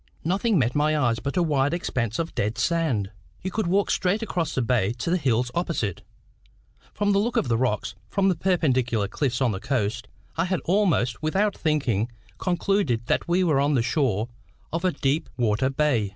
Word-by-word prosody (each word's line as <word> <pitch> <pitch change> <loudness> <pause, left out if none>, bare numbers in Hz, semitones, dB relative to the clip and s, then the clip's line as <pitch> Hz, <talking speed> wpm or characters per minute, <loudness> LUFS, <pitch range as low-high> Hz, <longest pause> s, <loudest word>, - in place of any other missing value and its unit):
Nothing 195 +5 +1
met 125 -4 +2
my 150 +1 +2
eyes 120 -5 +1
but 140 +8 -3
a 175 - +4
wide 145 -1 +1
expanse 115 -9 -2
of 165 0 -3
dead 105 +3 -1
sand. 145 - 0 0.3
You 190 - -3
could 215 -1 -1
walk 195 +3 +2
straight 200 +4 +1
across 175 -7 -2
the 130 - +1
bay 115 -4 +1
to 125 +7 -3
the 180 - +3
hills 125 -5 +1
opposite. 135 - -2 0.9
From 205 0 0
the 200 - +3
look 235 +4 0
of 125 - +1
the 115 - +2
rocks, 125 -5 0 0.2
from 195 -1 +1
the 190 - +4
perpendicular 130 - +1
cliffs 125 +3 -1
on 125 -3 +3
the 95 - -3
coast, 115 -4 -1 0.3
I 165 - +2
had 185 0 -1
almost, 170 - +1
without 195 +7 +1
thinking, 130 - 0 0.3
concluded 175 - 0
that - - 0
we 175 +2 +2
were 155 -6 +3
on 145 +1 +2
the 120 - +2
shore 120 - 0 0.5
of 165 +2 -1
a 185 - +3
deep 140 0 -1
water 120 +1 +1
bay. 135 -7 +1
145 Hz, 195 wpm, -25 LUFS, 120-175 Hz, 0.9 s, a